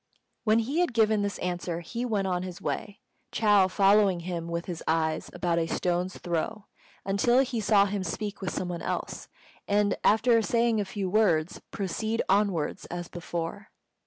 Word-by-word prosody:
When 215 0 +4
he 260 +8 0
had 350 -9 +1
given 215 -2 +3
this 205 0 -2
answer 175 -1 -3
he 230 +8 -4
went 210 -5 0
on 180 -2 0
his 180 -1 -7
way, 205 -1 -4 0.3
Chou 205 -3 +4
following 195 -1 +4
him 170 -1 -4
with 170 0 -3
his 175 -3 -5
eyes 160 -1 0
about 170 -1 0
a 165 - 0
stone's 180 +2 -1
throw, 175 +5 -3 0.4
until 220 +6 +3
he 250 -3 -2
saw 205 -1 +4
him 200 -1 -2
speak 205 +4 -4
with 190 - -2
some 180 - -3
one 175 -1 -4
else, - - -4 0.4
and, 205 0 +2
after 230 +2 +4
saying 230 -1 +2
a - - -2
few 195 0 -3
words, 180 -5 +2
proceed 220 +4 -2
onwards 195 -6 +1
as 175 0 -6
before. 175 +3 -5
195 Hz, 170 wpm, -28 LUFS, 175-215 Hz, 0.4 s, When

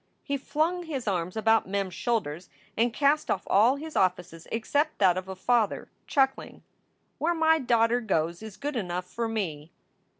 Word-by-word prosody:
He 280 - -2
flung 320 +6 -1
his 270 -7 -4
arms 180 0 -1
about 225 -2 +3
Mem 200 0 0
s 185 - -10
shoulders 180 -7 -2 0.3
and 235 +2 +2
cast 290 +4 +2
off 190 - 0
all 225 +7 +4
his 310 +2 -8
offices 180 -2 0
except 285 +7 0
that 185 -3 +4
of 185 +1 -5
a 190 - -5
father, 225 +2 0 0.2
chuckling: 270 -1 0 0.6
"Where 340 +2 +1
my 320 0 +4
daughter 240 -2 +2
goes 170 -5 -1
is 220 -3 -9
good 290 +6 -4
enough 180 -5 -3
for 230 +5 -3
me!" 165 -9 -3
225 Hz, 170 wpm, -27 LUFS, 185-275 Hz, 0.6 s, all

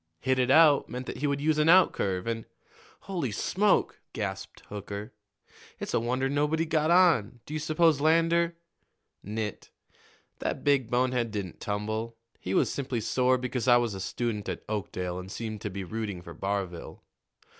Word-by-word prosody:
'Hit 130 -1 +1
it 125 0 +2
out,' 150 0 +6
meant 125 +1 -5
that - - -6
he 145 - -1
would 140 0 0
use 155 +1 +1
an 150 - +3
outcurve, 100 - +4
and 115 -1 -3 0.3
" - - -26
"Holy 175 - -3
smoke!" 195 - +1
gasped 95 -2 -5
Hooker. 105 +1 -6 0.7
"It's - - -5
a - - +3
wonder 125 +3 0
nobody 150 +4 +1
got 155 -1 +1
on. 165 - +4
Do 150 - -8
you 155 - -1
suppose 155 -1 +2
Lander 165 +2 +3 0.4
" - - -50
"Nit. 105 -2 -4 0.7
That - - -3
big 140 -5 +2
bonehead 125 -1 +1
didn't 100 -5 -5
tumble. 110 +2 -3 0.2
He 95 - -3
was - - +2
simply 130 -4 -2
sore 125 +3 +2
because 125 -1 -3
I 120 -1 +7
was 120 -3 0
a 95 - -6
student 105 +1 -3
at - - -5
Oakdale 90 -4 -3
and 95 +1 -9
seemed 110 -2 -5
to 105 - -3
be 100 0 -5
rooting 100 -2 -5
for - - -9
Barville. 95 -3 -4
120 Hz, 175 wpm, -28 LUFS, 105-150 Hz, 0.7 s, I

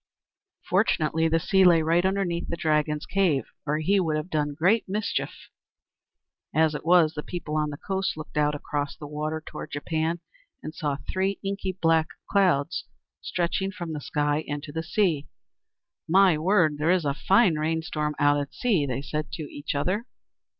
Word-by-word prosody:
Fortunately, 160 +1 +2
the 165 0 +2
sea 190 +3 +3
lay 170 -3 +6
right 165 +2 +3
underneath 190 -3 -1
the - - -2
Dragon's 150 -1 0
cave, 175 -10 +2 0.2
or 150 +1 +1
he 195 +6 +2
would 160 -4 0
have 155 +4 -5
done 150 -2 -1
great 185 +7 +2
mischief. 210 +2 -1 1.3
As 160 0 +4
it 150 - -5
was, 165 -2 +5
the 150 - -4
people 160 -2 -5
on 150 -1 +1
the 145 - -6
coast 190 -1 -2
looked 155 -1 -9
out 150 0 +2
across 145 -1 -3
the 150 - -8
water 155 +1 -4
toward 150 - -7
Japan, 160 +3 -2 0.4
and 155 - -6
saw 145 -4 -2
three 190 +1 0
inky 195 -1 -2
black 165 -3 +2 0.2
clouds 180 -8 +2 0.4
stretching 185 +2 -1
from 175 -4 -6
the 150 - -5
sky 150 +1 0
into 145 +1 -5
the 160 +2 -3
sea. 165 -4 0 0.8
"My 190 0 +5
word! 160 -2 +2
There 155 +2 +1
is 180 -3 +3
a 140 - +1
fine 190 +1 +3
rain 160 +1 0
storm 150 -1 -2
out 145 0 +3
at 140 -1 -5
sea!" 195 - +1
they 135 +1 -3
said 150 +1 -4
to 160 - -4
each 145 0 -5
other. 185 - -1
160 Hz, 175 wpm, -26 LUFS, 150-180 Hz, 1.3 s, lay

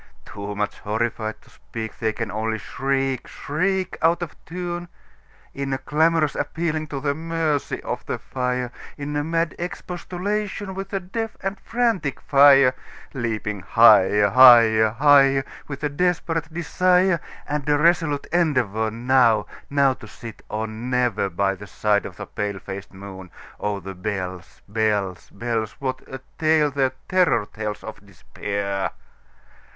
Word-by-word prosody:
Too 100 0 -6
much 105 0 -2
horrified 110 0 -2
to - - -21
speak, 110 -1 -8
They 110 -2 +1
can 110 -1 -4
only 110 +1 -2
shriek, 135 +3 -2
shriek, 185 +5 -2
Out 170 +2 +3
of 170 - -7
tune, 175 0 -5 0.7
In 140 -1 -3
a - - 0
clamorous 155 +1 +2
appealing 160 -2 -2
to 140 -2 -4
the 140 +1 0
mercy 160 -2 -2
of - - -4
the - - -2
fire, 125 -1 -2 0.3
In 145 0 -4
a 145 - 0
mad 165 +1 0
expostulation 190 +3 -4
with 195 +1 -6
the 195 - -2
deaf 220 +5 -5
and 195 0 -3
frantic 230 - 0
fire, 140 -2 +6 0.4
Leaping 110 -5 -3
higher, 105 -1 +5
higher, 115 -3 +7
higher, 135 +2 +5 0.2
With 140 0 -7
a 150 - +1
desperate 165 0 -1
desire, 180 +1 +2 0.3
And 150 0 -2
a 145 - +4
resolute 150 -2 +2
endeavorNow—now 125 - +2
to 110 - -13
sit 115 +1 -10
or 110 +1 -2
never, 120 -2 -1
By 95 +2 0
the 100 +1 -10
side 105 +1 +1
of - - -13
the - - -6
pale 100 -1 -3
faced 95 0 -8
moon. 95 -1 -10 0.3
Oh, 105 -1 -2
the 95 +1 -7
bells, 90 -2 -5
bells, 105 -4 -1
bells! 115 0 -3
What 130 -1 -4
a 130 -1 -7 0.2
tale 155 -2 +3
their 135 -1 +1
terror 180 - +3
tellsOf 105 -1 -6
Despair! 100 -1 -4
130 Hz, 140 wpm, -23 LUFS, 110-160 Hz, 0.7 s, higher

